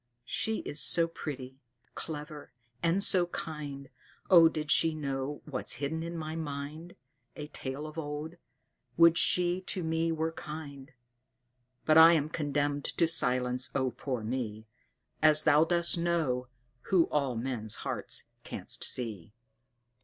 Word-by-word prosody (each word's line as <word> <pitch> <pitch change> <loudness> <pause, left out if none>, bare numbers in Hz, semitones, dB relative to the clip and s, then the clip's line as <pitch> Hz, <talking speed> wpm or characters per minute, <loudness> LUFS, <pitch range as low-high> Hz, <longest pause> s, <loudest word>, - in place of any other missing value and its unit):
She 220 +11 -2
is 145 0 -2
so 165 +3 +4
pretty, 135 -5 -7 0.3
clever, 150 -2 -7 0.3
and 170 +4 +2
so 180 -3 +5
kind 145 -5 -6 0.4
Oh, 165 -3 +8
did 150 -2 -3
she 160 -1 +4
know 140 -1 -4
what's 135 -4 -4
hidden 145 +5 -3
in 170 +1 -5
my 155 0 -5
mind 155 +2 -6 0.4
A 150 -1 -7
tale 135 +2 -6
of 155 +1 -7
old. 150 +2 -6 0.6
Would 170 0 +7
she 180 +1 +2
to 185 - -2
me 165 +1 0
were 160 0 -1
kind! 150 -3 -9 0.9
But 155 0 +6
I'm 160 -2 +6
condemned 145 -2 -1
to 165 - +1
silence! 125 -4 +1
oh, 130 -2 0
poor 125 -4 -4
me! 110 -2 -4 0.6
As 155 0 +6
Thou 150 +1 +5
dost 170 0 +2
know, 160 -8 0 0.4
who 180 -4 +4
all 140 -4 0
men's 115 -3 -2
hearts - - -3 0.2
canst - - -2
see. 105 -6 -2
150 Hz, 135 wpm, -30 LUFS, 135-165 Hz, 0.9 s, Oh